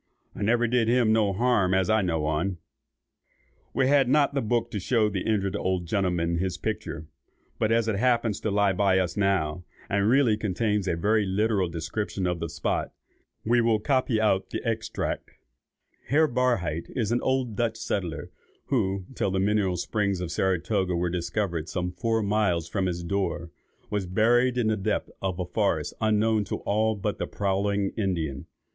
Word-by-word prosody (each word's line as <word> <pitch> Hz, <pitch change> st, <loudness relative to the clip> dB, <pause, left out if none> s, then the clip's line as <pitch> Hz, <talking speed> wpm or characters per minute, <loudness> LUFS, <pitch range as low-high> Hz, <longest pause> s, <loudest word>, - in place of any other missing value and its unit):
I -, -, -9 dB
never 120 Hz, +3 st, +2 dB
did 120 Hz, -1 st, +2 dB
him 120 Hz, -2 st, +3 dB
no 110 Hz, -3 st, +3 dB
harm 100 Hz, -3 st, +2 dB
as 95 Hz, -1 st, +2 dB
I 110 Hz, +2 st, +3 dB
know 80 Hz, -5 st, -1 dB
on." 80 Hz, +5 st, -1 dB, 1.1 s
We 130 Hz, +2 st, +1 dB
had 135 Hz, -1 st, +4 dB
not 145 Hz, +1 st, +3 dB
the 140 Hz, -, 0 dB
book 120 Hz, +1 st, 0 dB
to 105 Hz, -, -2 dB
show 110 Hz, +2 st, +2 dB
the 95 Hz, -2 st, -3 dB
injured 100 Hz, -2 st, 0 dB
old 95 Hz, -3 st, -1 dB
gentleman 85 Hz, -3 st, 0 dB
his 90 Hz, -1 st, -2 dB
picture, 95 Hz, -7 st, -4 dB, 0.5 s
but 110 Hz, -, +1 dB
as 115 Hz, 0 st, +2 dB
it 110 Hz, -3 st, 0 dB
happens 115 Hz, -2 st, +1 dB
to -, -, -2 dB
lie 100 Hz, -1 st, +2 dB
by 95 Hz, 0 st, +3 dB
us 90 Hz, -2 st, 0 dB
now, 90 Hz, -5 st, 0 dB, 0.3 s
and 100 Hz, +1 st, +2 dB
really 125 Hz, -4 st, +4 dB
contains 105 Hz, -1 st, -1 dB
a 85 Hz, -, +1 dB
very 105 Hz, +5 st, +2 dB
literal 100 Hz, -1 st, +1 dB
description 85 Hz, +4 st, -3 dB
of 90 Hz, -1 st, -1 dB
the 85 Hz, 0 st, -3 dB
spot, -, -, -2 dB, 0.5 s
we 120 Hz, +2 st, +3 dB
will 115 Hz, -1 st, +3 dB
copy 130 Hz, -1 st, +1 dB
out 105 Hz, -3 st, +1 dB
the -, -, -4 dB
extract:— 110 Hz, 0 st, -2 dB, 0.8 s
"Herr 155 Hz, +3 st, +4 dB
Barhydt 120 Hz, -, 0 dB
is 115 Hz, -3 st, 0 dB
an 120 Hz, -, +1 dB
old 130 Hz, -4 st, 0 dB
Dutch 115 Hz, 0 st, -1 dB
settler, 85 Hz, -6 st, -3 dB, 0.4 s
who, 95 Hz, -7 st, 0 dB
till 100 Hz, -, -1 dB
the 95 Hz, 0 st, 0 dB
mineral 100 Hz, -2 st, +1 dB
springs 100 Hz, +1 st, -1 dB
of 90 Hz, -2 st, -4 dB
Saratoga 95 Hz, 0 st, 0 dB
were 85 Hz, 0 st, 0 dB
discovered 85 Hz, -2 st, -2 dB
some 90 Hz, +2 st, -2 dB
four 115 Hz, +3 st, 0 dB
miles 100 Hz, -5 st, +1 dB
from 95 Hz, +2 st, -1 dB
his 85 Hz, -1 st, -3 dB
door, 85 Hz, -2 st, -2 dB, 0.4 s
was 100 Hz, -3 st, -1 dB
buried 120 Hz, +6 st, +3 dB
in 120 Hz, -, +1 dB
the 110 Hz, 0 st, +1 dB
depth 95 Hz, -, -2 dB
of 95 Hz, -1 st, -2 dB
a 90 Hz, -, -1 dB
forest 90 Hz, -, 0 dB
unknown 110 Hz, 0 st, +2 dB
to -, -, -3 dB
all 110 Hz, +2 st, +1 dB
but 100 Hz, +1 st, -3 dB
the -, -, -2 dB
prowling 100 Hz, 0 st, 0 dB
Indian. 85 Hz, -, -2 dB
100 Hz, 175 wpm, -26 LUFS, 90-110 Hz, 1.1 s, had